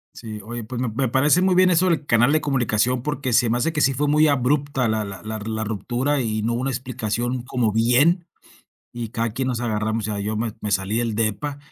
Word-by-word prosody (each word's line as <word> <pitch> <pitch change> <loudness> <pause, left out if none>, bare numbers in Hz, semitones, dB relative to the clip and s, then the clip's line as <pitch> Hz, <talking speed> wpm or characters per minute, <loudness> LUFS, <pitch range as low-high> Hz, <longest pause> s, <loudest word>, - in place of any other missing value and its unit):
Sí, 110 -2 -8
oye, 120 +2 -6
pues, 120 +2 -6
me 125 -1 -1
me 130 +4 -1
parece 145 +8 +3
muy 185 -1 +3
bien 185 0 +5
eso 180 +2 +3
del 160 -4 0
canal 120 +1 +3
de 155 - +3
comunicación, 125 -3 +1
porque 135 -2 -2
se 120 -1 +4
me 120 - +1
hace 155 +7 0
que 150 - 0
sí 135 0 +3
fue 145 +3 0
muy 150 +2 +4
abrupta 140 -1 +1
la 110 -1 0
la 100 -3 -8
la 110 0 -5
la 110 +1 -3
ruptura, 120 +7 -1
y 110 -2 -2
no 115 +2 0
hubo 120 - -2
una 135 - -1
explicación 120 -1 -3
como 120 -2 -1
bien. 130 - +3 0.6
Y 120 -2 -6
cada 115 -1 -1
quien 130 +3 -2
nos 120 -2 -2
agarramos 110 -1 -1
ahí. 105 - -2
O - - -3
sea, 100 - -4
yo 110 0 -2
me 110 -1 -2
me 105 - -3
salí 95 +2 0
del 115 -2 0
depa, 115 +7 -2
120 Hz, 245 wpm, -22 LUFS, 110-140 Hz, 0.6 s, bien